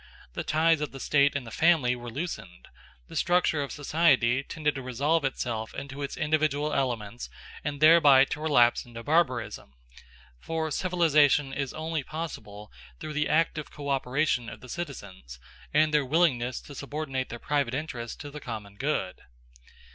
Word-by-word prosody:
The -, -, -3 dB
ties 160 Hz, 0 st, +2 dB
of 150 Hz, -, -3 dB
the 135 Hz, -, -8 dB
state 140 Hz, +1 st, +3 dB
and 140 Hz, -3 st, -2 dB
the 115 Hz, -, -9 dB
family 155 Hz, -6 st, +3 dB
were 120 Hz, 0 st, -8 dB
loosened: 135 Hz, -, -6 dB, 0.4 s
the -, -, -11 dB
structure 175 Hz, -4 st, +2 dB
of 140 Hz, -, -4 dB
society 135 Hz, -5 st, +2 dB
tended 150 Hz, +1 st, -2 dB
to 135 Hz, -, -6 dB
resolve 140 Hz, +6 st, 0 dB
itself 115 Hz, -4 st, -3 dB
into 140 Hz, +1 st, -7 dB
its 140 Hz, -, -4 dB
individual 150 Hz, -1 st, 0 dB
elements 120 Hz, -4 st, -2 dB, 0.3 s
and 145 Hz, -1 st, -3 dB
thereby 150 Hz, -4 st, +7 dB
to 150 Hz, -, -5 dB
relapse 125 Hz, -6 st, +4 dB
into 115 Hz, -1 st, -10 dB
barbarism; 145 Hz, -, 0 dB, 0.7 s
for 160 Hz, -, -3 dB
civilisation 150 Hz, -5 st, +3 dB
is 135 Hz, -2 st, -3 dB
only 160 Hz, 0 st, -3 dB
possible 130 Hz, -9 st, -7 dB, 0.3 s
through 155 Hz, -, -6 dB
the 150 Hz, 0 st, 0 dB
active 155 Hz, -1 st, +1 dB
co 145 Hz, -1 st, -7 dB
operation 135 Hz, -2 st, 0 dB
of -, -, -11 dB
the 125 Hz, -, -12 dB
citizens 100 Hz, -, -7 dB, 0.3 s
and 155 Hz, +1 st, +3 dB
their 150 Hz, -1 st, +4 dB
willingness 130 Hz, -4 st, +1 dB
to 145 Hz, -, -12 dB
subordinate 140 Hz, -1 st, -4 dB
their 120 Hz, -, -6 dB
private 140 Hz, -1 st, -1 dB
interests 135 Hz, -6 st, -5 dB
to 145 Hz, -2 st, -8 dB
the 150 Hz, -, -8 dB
common 105 Hz, -5 st, -7 dB
good. 135 Hz, -9 st, -2 dB
140 Hz, 160 wpm, -27 LUFS, 125-155 Hz, 0.7 s, thereby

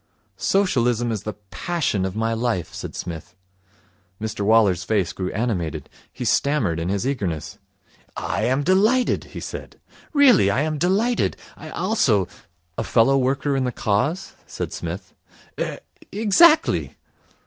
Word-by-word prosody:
'Socialism 120 Hz, -, +1 dB
is 110 Hz, -4 st, -2 dB
the 110 Hz, -, -5 dB, 0.2 s
passion 150 Hz, -, -1 dB
of 95 Hz, 0 st, -4 dB
my 115 Hz, +1 st, 0 dB
life,' 115 Hz, -6 st, -2 dB
said -, -, -7 dB
Psmith. 85 Hz, 0 st, -7 dB, 0.8 s
Mr 110 Hz, -1 st, -4 dB
Waller's 100 Hz, -4 st, +4 dB
face 95 Hz, -6 st, 0 dB
grew 90 Hz, 0 st, -3 dB
animated. 95 Hz, -8 st, -3 dB, 0.2 s
He 125 Hz, -, -6 dB
stammered 115 Hz, -, +1 dB
in 85 Hz, +2 st, -2 dB
his 100 Hz, +4 st, -1 dB
eagerness. 95 Hz, -, -3 dB, 0.6 s
'I -, -, -1 dB
am 130 Hz, +3 st, +1 dB
delighted,' 215 Hz, -, +2 dB
he -, -, -9 dB
said. -, -, -8 dB, 0.3 s
'Really, 260 Hz, -, +5 dB
I 120 Hz, +7 st, +1 dB
am 155 Hz, -1 st, -2 dB
delighted. 210 Hz, -, +1 dB, 0.2 s
I 155 Hz, -, -10 dB
also 155 Hz, -, +1 dB, 0.2 s
' 85 Hz, 0 st, -44 dB
'A -, -, 0 dB
fellow 120 Hz, +4 st, +3 dB
worker 135 Hz, +2 st, 0 dB
in 135 Hz, -, +1 dB
the 125 Hz, -, -1 dB
Cause?' 140 Hz, -, -1 dB
said -, -, -5 dB
Psmith. -, -, -6 dB, 0.5 s
'Er -, -, -2 dB, 0.3 s
exactly.' 225 Hz, -, +4 dB
120 Hz, 140 wpm, -22 LUFS, -, 0.8 s, Really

